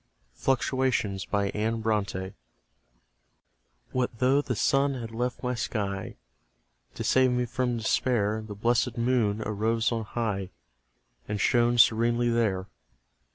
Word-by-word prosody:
FLUCTUATIONS, 130 - 0 2.6
What 130 -1 0
though 130 +4 +3
the 125 -4 -3
Sun 135 +5 +2
had 115 -3 -6
left 120 +3 -3
my 125 0 0
sky; 100 -4 -3 0.8
To - - -4
save 130 0 +4
me 125 0 0
from 125 0 -1
despair 110 -1 +1
The 105 -1 -8
blessed 120 +3 +1
Moon 115 -3 +1
arose 110 +2 0
on 115 -1 -1
high, 105 -5 -2 0.8
And 105 0 -3
shone 120 +2 +3
serenely 120 +1 +4
there. 105 -6 +1
115 Hz, 110 wpm, -27 LUFS, 110-125 Hz, 2.6 s, save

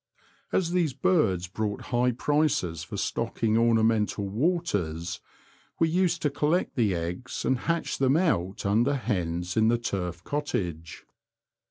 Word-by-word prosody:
As 170 -2 +1
these 175 -6 +1
birds 100 - +2
brought 105 +3 -3
high 125 +1 +3
prices 125 - 0
for 80 - -7
stocking 110 -1 -1
ornamental 110 -3 +2
waters, 100 - -1 0.6
we 165 - +2
used 175 0 +1
to 150 - +2
collect 150 +5 0
the 110 -7 +2
eggs 85 +8 -4
and 130 -1 +2
hatch 165 0 0
them 135 +2 +3
out 100 - 0
under 115 +8 +2
hens 90 -7 -2
in 110 0 +4
the 120 +1 +3
turf 90 -7 -3
cottage. 90 - -3
115 Hz, 135 wpm, -27 LUFS, 90-150 Hz, 0.6 s, in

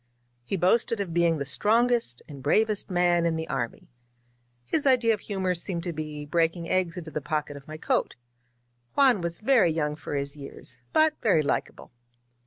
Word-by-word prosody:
He 195 +11 -2
boasted 205 +5 +2
of 190 -5 -3
being 170 -1 +3
the 140 - -3
strongest 225 - +1
and 140 -3 -10
bravest 210 +9 +1
man 175 -1 +2
in 165 -1 +1
the 160 0 -4
army. 125 -4 -4 0.8
His 290 - 0
idea 240 -4 +4
of 210 - -3
humor 190 -3 -1
seemed 170 0 -2
to 175 -1 -3
be 150 -1 -6
breaking 165 +2 0
eggs 180 -2 0
into 160 -2 -7
the 150 - -3
pocket 150 -1 -3
of 140 -1 -12
my 155 0 -7
coat. - - 0 0.8
Juan 260 -8 +5
was 170 0 -3
very 225 -5 +4
young 150 -2 -1
for 150 - -6
his 140 0 -3
years, 135 -3 -10
but 315 0 +4
very 190 -10 +3
likable. 140 - -3
170 Hz, 180 wpm, -27 LUFS, 150-205 Hz, 0.8 s, Juan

